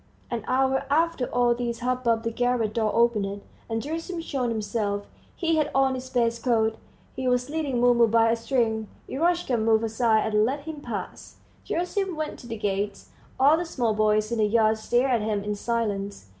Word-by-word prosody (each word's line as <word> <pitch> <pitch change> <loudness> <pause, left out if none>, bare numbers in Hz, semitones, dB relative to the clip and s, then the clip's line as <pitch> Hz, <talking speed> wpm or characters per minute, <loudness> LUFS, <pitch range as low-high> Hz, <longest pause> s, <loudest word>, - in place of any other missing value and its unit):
An 235 -3 -2
hour 265 +1 +1
after 320 -2 +1
all 245 0 +2
this 235 -1 -3
hubbub 245 -2 0
the 230 - -1
garret 245 -2 0
door 220 -2 +1
opened, 210 -4 +1 0.3
and 225 0 -2
Gerasim 330 +4 -4
showed 260 -6 -2
himself. 205 -2 -2 0.3
He 330 -2 +1
had 300 -1 +1
on 270 -1 +3
his 255 0 -6
best 235 -2 0
coat; 225 -3 +1 0.4
he 260 0 -3
was 250 +2 +1
leading 295 -6 -1
Mumu 240 -1 +5
by 225 +1 +4
a - - +3
string. 230 -2 0 0.2
Eroshka 335 -3 +1
moved 220 0 +2
aside 220 -1 +1
and 210 0 +4
let 270 +6 -1
him 305 0 -7
pass. - - -6 0.3
Gerasim 365 +2 -1
went 310 -1 -4
to 240 - -11
the 230 -1 -5
gates. 200 -1 -3 0.3
All 285 +4 +6
the 345 - -1
small 240 -8 0
boys 215 +1 +2
in 235 - -1
the 215 - +4
yard 220 0 +3
stared 245 +4 +1
at 235 -3 +2
him 210 -1 -1
in 210 0 -2
silence. 205 - -2
235 Hz, 185 wpm, -26 LUFS, 220-265 Hz, 0.4 s, All